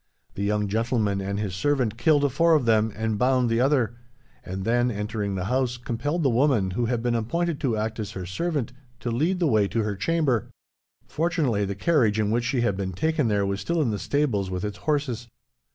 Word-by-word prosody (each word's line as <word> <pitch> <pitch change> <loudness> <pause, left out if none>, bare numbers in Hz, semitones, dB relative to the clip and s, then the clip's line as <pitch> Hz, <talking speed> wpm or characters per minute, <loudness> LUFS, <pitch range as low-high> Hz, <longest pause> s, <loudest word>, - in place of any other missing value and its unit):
The - - -6
young 105 0 0
gentleman 110 -2 0
and 100 +1 -3
his 100 -3 -3
servant 125 +2 0
killed 145 +2 +2
four 165 +2 +4
of 145 -5 +1
them, 110 -1 +3
and 110 -1 -2
bound 125 -1 +2
the 115 +1 +2
other; 125 -4 +2 0.5
and 95 +1 -5
then, 120 +2 +2
entering 105 -2 -3
the 90 -1 -2
house, 125 +2 0
compelled 145 +8 -2
the 135 - +4
woman 120 -6 +2
who 120 +6 -1
had 120 -1 -1
been 120 -1 +1
appointed 160 +8 -1
to 120 -5 0
act 110 +1 -3
as 105 -1 -4
her 95 -1 -5
servant 140 - -2 0.3
to 120 - -2
lead 160 +11 +1
the 175 - +1
way 110 -8 +3
to 115 +2 -1
her 105 -1 -2
chamber. 135 - 0 0.6
Fortunately, 150 - 0
the 100 0 -3
carriage 115 - +2
in 105 -1 +1
which 120 +1 +1
she 125 0 0
had 100 -5 +1
been 95 -1 -3
taken 155 - 0
there 100 -2 +1
was 100 +1 -2
still 170 0 -1
in 135 -7 +1
the 105 - -3
stables, 120 -10 0
with 90 +1 -3
its 105 - -5
horses. 130 -6 -1
115 Hz, 215 wpm, -25 LUFS, 105-140 Hz, 0.6 s, four